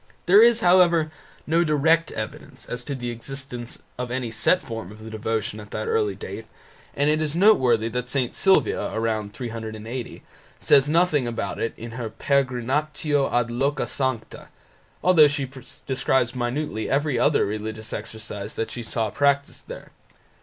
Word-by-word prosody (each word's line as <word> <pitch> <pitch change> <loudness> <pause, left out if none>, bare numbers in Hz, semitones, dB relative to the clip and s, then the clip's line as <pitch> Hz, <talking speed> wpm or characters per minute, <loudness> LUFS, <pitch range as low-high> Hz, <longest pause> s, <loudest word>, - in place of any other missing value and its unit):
There 195 +4 +7
is, 235 0 +6
however, 175 -4 +4 0.3
no 165 +2 +3
direct 160 +1 +2
evidence 140 -4 -7
as 125 0 -5
to 140 - -3
the 120 -2 -4
existence 120 0 -6 0.2
of 125 -1 -3
any 120 -2 -3
set 115 +11 +3
form 115 - -7
of 110 +1 -12
the 110 - -8
devotion 110 -1 -2
at 105 -1 -11
that - - -4
early 445 -2 +1
date, - - -8 0.5
and 145 - +1
it 155 +1 +2
is 155 0 -1
noteworthy 130 - +4
that 125 +1 -4
St. 130 -3 -1
Sylvia 190 -1 +2
(c. 110 -2 -1
380) 115 +1 -6 0.4
says 140 +1 +4
nothing 155 -5 +3
about 120 0 -3
it 115 - -2
in 115 0 -8
her 115 -1 -5
"Peregrinatio 140 +4 0
ad 120 -1 +1
loca 140 +5 0
sancta", 130 -4 -3 0.6
although 170 -5 +7
she 145 -2 -2 0.4
describes 130 -2 +1
minutely 125 -1 -2
every 140 -2 +1
other 145 - +3
religious 110 +1 -5
exercise 105 -2 -6
that 115 - -3
she 120 - -5
saw 110 -2 -2
practised 140 0 0
there. - - -9
130 Hz, 155 wpm, -24 LUFS, 115-150 Hz, 0.6 s, There